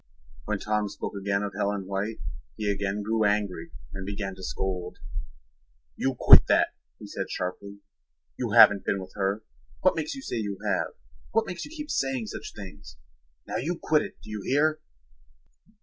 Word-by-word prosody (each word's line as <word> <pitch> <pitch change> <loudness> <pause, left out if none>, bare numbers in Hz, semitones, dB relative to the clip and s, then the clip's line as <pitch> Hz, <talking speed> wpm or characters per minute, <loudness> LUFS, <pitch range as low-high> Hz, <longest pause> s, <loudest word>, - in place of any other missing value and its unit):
When 105 0 0
Tom 105 +1 0
spoke 100 - -5
again 100 0 0
of 100 -1 -3
Helen 100 -1 0
White 100 +3 -2 0.4
he 105 -1 +1
again 100 +1 -1
grew 110 +1 +1
angry 100 -5 +1 0.2
and 95 0 -5
began 100 0 -3
to 95 - -11
scold. 90 -1 -3 1.0
"You 135 -1 0
quit - - +10
that," - - +4 0.3
he - - -10
said - - -4
sharply. 100 +2 -4 0.5
"You - - -2
haven't 100 -2 +8
been 100 - 0
with 95 0 -9
her. 100 +2 0 0.4
What 185 - +4
makes 155 - -2
you 270 - -7
say - - -3
you 100 -3 -2
have? - - 0 0.4
What 225 0 +3
makes 175 -3 -5
you - - -10
keep 300 -2 -5
saying 135 -4 0
such 105 - -7
things? 95 - -10 0.5
Now - - -2
you 170 +6 -1
quit 155 -1 +3
it, - - -7
do - - -9
you 105 -1 -4
hear?" 155 +5 +3
105 Hz, 175 wpm, -28 LUFS, 95-125 Hz, 1.0 s, quit